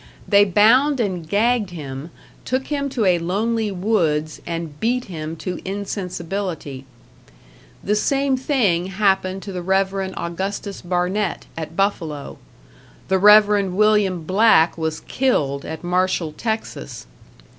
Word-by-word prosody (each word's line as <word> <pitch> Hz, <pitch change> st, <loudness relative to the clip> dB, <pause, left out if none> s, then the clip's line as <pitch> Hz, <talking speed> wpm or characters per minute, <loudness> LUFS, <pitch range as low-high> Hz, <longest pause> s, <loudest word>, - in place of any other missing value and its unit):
They 205 Hz, 0 st, +6 dB
bound 245 Hz, +9 st, +4 dB
and 180 Hz, -8 st, -2 dB
gagged 220 Hz, 0 st, +2 dB
him, 145 Hz, -3 st, -7 dB, 0.3 s
took 260 Hz, +1 st, -1 dB
him 280 Hz, -1 st, -1 dB
to 250 Hz, -5 st, -1 dB
a 180 Hz, -2 st, +3 dB
lonely 215 Hz, +6 st, -1 dB
woods, 170 Hz, -6 st, 0 dB
and 165 Hz, -3 st, -5 dB
beat 245 Hz, +2 st, 0 dB
him 160 Hz, -3 st, -6 dB
to 180 Hz, +3 st, -5 dB
insensibility. 185 Hz, -7 st, -4 dB, 1.0 s
The 205 Hz, -, 0 dB
same 275 Hz, +4 st, +1 dB
thing 225 Hz, -, +1 dB
happened 190 Hz, -1 st, 0 dB
to 200 Hz, -, -6 dB
the 180 Hz, -1 st, -4 dB
Rev. 190 Hz, +2 st, +1 dB
Augustus 190 Hz, +1 st, -4 dB
Barnett, 180 Hz, +4 st, -1 dB
at 160 Hz, 0 st, -6 dB
Buffalo; 165 Hz, -7 st, -2 dB, 0.7 s
the 190 Hz, 0 st, +3 dB
Rev. 210 Hz, 0 st, +6 dB
William 205 Hz, -4 st, +2 dB
Black 185 Hz, -2 st, +4 dB
was 160 Hz, -1 st, -3 dB
killed 145 Hz, -, 0 dB
at 160 Hz, +1 st, -7 dB
Marshall, 180 Hz, -2 st, 0 dB
Texas. 220 Hz, -, -5 dB
190 Hz, 125 wpm, -21 LUFS, 170-215 Hz, 1.0 s, They